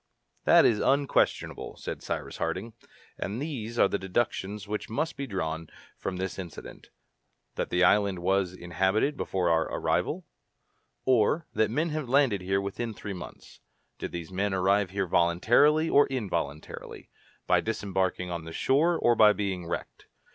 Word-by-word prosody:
"That -, -, +7 dB
is 110 Hz, -3 st, +3 dB
unquestionable," 140 Hz, +1 st, +1 dB
said -, -, -6 dB
Cyrus -, -, -4 dB
Harding, 110 Hz, +5 st, -3 dB, 0.5 s
"and 105 Hz, +4 st, -3 dB
these 120 Hz, -6 st, -4 dB
are -, -, +5 dB
the 100 Hz, -, -2 dB
deductions 100 Hz, 0 st, -2 dB
which 105 Hz, 0 st, -4 dB
must 150 Hz, +8 st, -2 dB
be 140 Hz, -, -5 dB
drawn 80 Hz, -6 st, -3 dB, 0.3 s
from 90 Hz, -, -3 dB
this 95 Hz, +1 st, -4 dB
incident: 85 Hz, -4 st, -9 dB, 0.6 s
that -, -, -3 dB
the 90 Hz, +1 st, +2 dB
island 100 Hz, 0 st, +4 dB
was 95 Hz, +1 st, +1 dB
inhabited 95 Hz, +10 st, 0 dB
before 90 Hz, -9 st, 0 dB
our 80 Hz, -1 st, +3 dB
arrival, -, -, -1 dB, 0.8 s
or 130 Hz, +6 st, +3 dB
that 110 Hz, -, +2 dB
men 155 Hz, +9 st, 0 dB
have 155 Hz, -5 st, -3 dB
landed 130 Hz, -7 st, +3 dB
here 95 Hz, +1 st, 0 dB
within 105 Hz, +3 st, -4 dB
three 100 Hz, -1 st, -6 dB
months. 90 Hz, -, -10 dB, 0.4 s
Did -, -, -4 dB
these 85 Hz, 0 st, -6 dB
men 95 Hz, +1 st, -1 dB
arrive 95 Hz, +1 st, +2 dB
here 100 Hz, +1 st, -1 dB
voluntarily 110 Hz, -, +3 dB
or 145 Hz, -2 st, +5 dB
involuntarily, 85 Hz, -, -4 dB, 0.3 s
by -, -, +3 dB
disembarking 95 Hz, -4 st, -2 dB
on 85 Hz, -2 st, -4 dB
the 80 Hz, 0 st, -8 dB
shore 160 Hz, -, +2 dB
or 120 Hz, -, +4 dB
by 105 Hz, -2 st, +7 dB
being 95 Hz, -5 st, -3 dB
wrecked? 85 Hz, -, -6 dB
100 Hz, 155 wpm, -28 LUFS, 90-120 Hz, 0.8 s, That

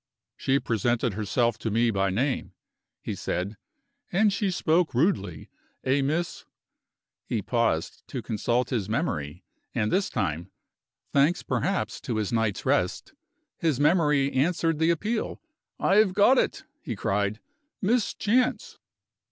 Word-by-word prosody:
"She 135 Hz, +1 st, +1 dB
presented 120 Hz, -1 st, 0 dB
herself 110 Hz, +3 st, 0 dB
to 115 Hz, -, -2 dB
me 115 Hz, +2 st, +2 dB
by 100 Hz, -1 st, +1 dB
name," 125 Hz, +8 st, -1 dB, 0.5 s
he -, -, -3 dB
said; 95 Hz, +4 st, -3 dB, 0.6 s
"and 200 Hz, +2 st, +3 dB
she 200 Hz, 0 st, 0 dB
spoke 170 Hz, -3 st, +1 dB
rudely. 110 Hz, -, 0 dB, 0.3 s
A 135 Hz, +2 st, +2 dB
Miss 160 Hz, +5 st, -1 dB, 0.4 s
" -, -, -64 dB
He 110 Hz, -4 st, -1 dB
paused 115 Hz, -10 st, -1 dB
to -, -, -5 dB
consult 120 Hz, +4 st, 0 dB
his 110 Hz, -6 st, -1 dB
memory, 90 Hz, -, -2 dB, 0.3 s
and 105 Hz, -, 0 dB
this 195 Hz, 0 st, +1 dB
time 90 Hz, -4 st, -2 dB, 0.6 s
(thanks 145 Hz, +5 st, +3 dB
perhaps 195 Hz, 0 st, -1 dB
to 120 Hz, -, -3 dB
his 110 Hz, 0 st, -1 dB
night's 115 Hz, -3 st, 0 dB
rest) -, -, 0 dB, 0.5 s
his 155 Hz, -6 st, +1 dB
memory 150 Hz, -3 st, +3 dB
answered 165 Hz, +2 st, +1 dB
the 160 Hz, +1 st, +3 dB
appeal. 210 Hz, +7 st, -1 dB, 0.4 s
"I 195 Hz, -, +3 dB
have 205 Hz, -4 st, +4 dB
got 225 Hz, +6 st, +6 dB
it!" -, -, -1 dB, 0.2 s
he 115 Hz, -, -4 dB
cried 100 Hz, +2 st, -1 dB, 0.4 s
"Miss 225 Hz, +3 st, +1 dB
Chance." 250 Hz, +4 st, 0 dB
130 Hz, 135 wpm, -26 LUFS, 110-175 Hz, 0.6 s, got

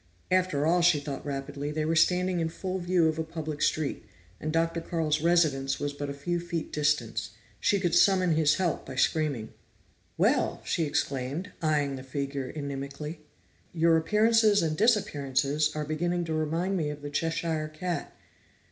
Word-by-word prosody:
After 185 Hz, -6 st, +2 dB
all, 175 Hz, +2 st, +3 dB
she 170 Hz, -3 st, +5 dB
thought 140 Hz, -1 st, -6 dB
rapidly, 140 Hz, 0 st, -4 dB
they 155 Hz, 0 st, -1 dB
were 165 Hz, +1 st, +1 dB
standing 180 Hz, +2 st, +3 dB
in 165 Hz, -1 st, 0 dB
full 185 Hz, +3 st, -4 dB
view 175 Hz, -2 st, +2 dB
of 160 Hz, 0 st, -1 dB
a -, -, 0 dB
public 160 Hz, -2 st, -6 dB
street, 155 Hz, -3 st, 0 dB, 0.4 s
and 155 Hz, -, -3 dB
Dr. 165 Hz, +1 st, 0 dB
Carl's 160 Hz, -2 st, -1 dB
residence 150 Hz, -6 st, +2 dB
was 145 Hz, 0 st, -2 dB
but 145 Hz, 0 st, -5 dB
a -, -, -3 dB
few 175 Hz, +5 st, -2 dB
feet 170 Hz, -2 st, -4 dB
distant. 150 Hz, -8 st, 0 dB, 0.3 s
She 200 Hz, -, +2 dB
could 175 Hz, -3 st, 0 dB
summon 185 Hz, 0 st, +4 dB
his 155 Hz, -1 st, +3 dB
help 175 Hz, -5 st, -1 dB
by 130 Hz, -, -8 dB
screaming. 140 Hz, -5 st, 0 dB, 0.6 s
"Well!" -, -, +2 dB
she 165 Hz, -, 0 dB
exclaimed, 145 Hz, +5 st, -2 dB
eyeing 145 Hz, -4 st, +1 dB
the 130 Hz, -, -8 dB
figure 135 Hz, 0 st, -4 dB
inimically. 140 Hz, +2 st, -5 dB, 0.5 s
"Your 165 Hz, 0 st, +4 dB
appearances 210 Hz, +4 st, +4 dB
and 155 Hz, -1 st, 0 dB
disappearances 150 Hz, -, +2 dB
are 150 Hz, 0 st, -2 dB
beginning 175 Hz, +3 st, -1 dB
to 160 Hz, -, -3 dB
remind 165 Hz, +5 st, 0 dB
me 155 Hz, -4 st, -1 dB
of 150 Hz, 0 st, -7 dB
the 145 Hz, -, -5 dB
Cheshire 165 Hz, 0 st, -1 dB
Cat." 170 Hz, 0 st, -4 dB
155 Hz, 165 wpm, -28 LUFS, 145-175 Hz, 0.6 s, she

